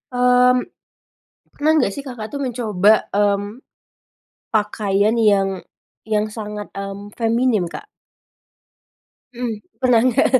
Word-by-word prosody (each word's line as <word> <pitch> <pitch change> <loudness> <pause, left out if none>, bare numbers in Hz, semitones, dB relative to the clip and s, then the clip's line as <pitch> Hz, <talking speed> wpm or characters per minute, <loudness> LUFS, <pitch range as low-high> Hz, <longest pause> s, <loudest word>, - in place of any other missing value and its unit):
mmm, 250 0 +4 1.0
pernah 300 +2 0
nggak 255 -10 +2
sih 280 - -6
Kakak 245 -5 -8
tuh 285 - -4
mencoba, 220 -5 +1
mmm, 205 +3 0 0.9
pakaian 210 0 +1
yang 195 -4 +2 0.4
yang 215 0 0
sangat, 210 -1 -7
mmm, 195 +1 -6
feminim, 230 -3 +1
Kak? 415 - -8 1.5
Mhm, 240 -1 -3 0.2
pernah 250 -3 +4
nggak, 250 - +3
220 Hz, 105 wpm, -20 LUFS, 205-250 Hz, 1.5 s, mmm